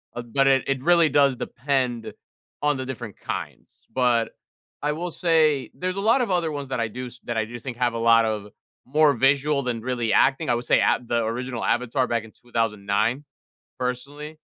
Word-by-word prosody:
um, 120 -1 -7
but 135 0 +4
it 135 -1 +4
it 135 -1 -1
really 170 -2 +5
does 140 -2 +4
depend 125 -3 -2 0.5
on 145 -2 +2
the 130 - -4
different 120 -5 -7
kinds, - - -7
but 120 -3 +2 0.5
I 150 +1 0
will 175 +2 -4
say 155 -6 +2
there's 185 +1 -3
a 195 - -2
lot 230 +5 +4
of 235 - -1
other 170 -3 +1
ones 140 -2 -5
that 125 - -2
I 115 - 0
do 125 +3 -6
s 125 +1 -11
that 120 - -3
I 110 - +1
do 120 +2 -8
think 120 0 -7
have 120 -1 +1
a - - -3
lot 115 0 +5
of 105 -2 -2 0.4
more 150 +2 +4
visual 140 +2 +2
than 120 -3 -2
really 120 -2 -1
acting, 135 +1 +3
I 120 - +3
would 120 +1 -4
say - - +4
at 120 0 +1
the 120 -1 +1
original 120 +1 -3
Avatar 125 +2 +1
back 115 -1 -1
in 110 - -14
2009, 115 +2 -1 0.5
personally, 145 +5 -5
125 Hz, 200 wpm, -24 LUFS, 120-145 Hz, 0.5 s, really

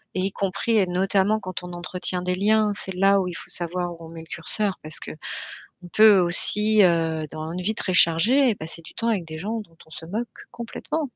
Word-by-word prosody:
et - - 0
y 195 +1 0
compris 200 +4 0
et 200 - +4
notamment, 190 +3 +2
quand 185 -2 -6
on 180 0 -7
entretient 180 +1 -3
des 180 0 0
liens, 210 +2 +3
c'est 190 -1 -3
là 195 +1 +4
où 185 - -1
il 180 - -4
faut - - -9
savoir 175 0 -3
où - - -12
on - - -11
met 165 0 -9
le 160 - -13
curseur 190 +5 -2
parce 155 0 -6
qu'on 155 - -8 0.6
peut 215 -3 +7
aussi, 210 +4 +3
heu, 165 -2 +2
dans 155 +1 -5
une 175 +2 -4
vie 210 +5 -1
très 190 - -1
chargée, 220 +10 +4
passer 165 -2 -8
du - - -14
temps 230 - -1
avec 205 -7 +1
des 160 -1 -8
gens 215 +7 -3
dont 165 -5 -22
on - - -23
se 160 - -9
moque 220 +6 -3 0.2
complètement. 285 +5 -4
185 Hz, 225 wpm, -24 LUFS, 170-210 Hz, 0.6 s, peut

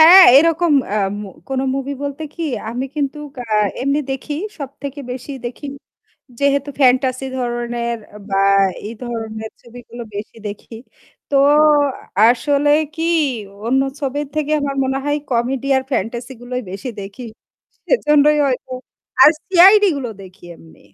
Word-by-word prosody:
হ্যাঁ, 355 +4 +10
এরকম 330 +1 +3 0.2
আ 215 - 0 0.3
মো 200 - -8 0.2
কোনো 265 0 -1
movie 275 +1 -3
বলতে 285 +2 -4
কি 340 - -5 0.3
আমি 245 +3 -3
কিন্তু 285 0 -2 0.2
আ 220 -3 -3 0.3
এমনি 280 +3 +1
দেখি। 270 +3 -4 0.2
সবথেকে 280 0 -7
বেশি 255 +3 -8
দেখি, 245 +4 -6 0.7
যেহেতু 280 0 +1
fantasy 255 0 +3
ধরনের 240 -1 -3 0.3
বা 195 - -1 0.5
এই 220 - -6
ধরনের 220 -2 -5
ছবিগুলো 240 0 -11
বেশি 205 +2 -7
দেখি। 210 +2 -8 0.5
তো 280 - +1 0.9
আসলে 280 +4 +2 0.2
কি 325 - -4 0.6
অন্য 265 +3 +2 0.2
ছবির 285 +1 -2
থেকে 305 -1 -1
আমার 280 -1 -2
মনে 265 +1 -1
হয় 290 0 0
comedy 250 +2 -1
আর 265 - +1
fantasy 235 +4 -3
গুলোই 250 +1 -4
বেশি 195 +7 -6
দেখি। 200 +5 -9 0.6
সেজন্যই 300 -9 +3
হয়তো। 260 -1 -3 0.5
আর - - +10 0.2
CID 385 +3 +7
গুলো 265 -3 -4
দেখি 185 0 -15
এমনি। 165 - -18
265 Hz, 135 wpm, -18 LUFS, 235-290 Hz, 0.9 s, হ্যাঁ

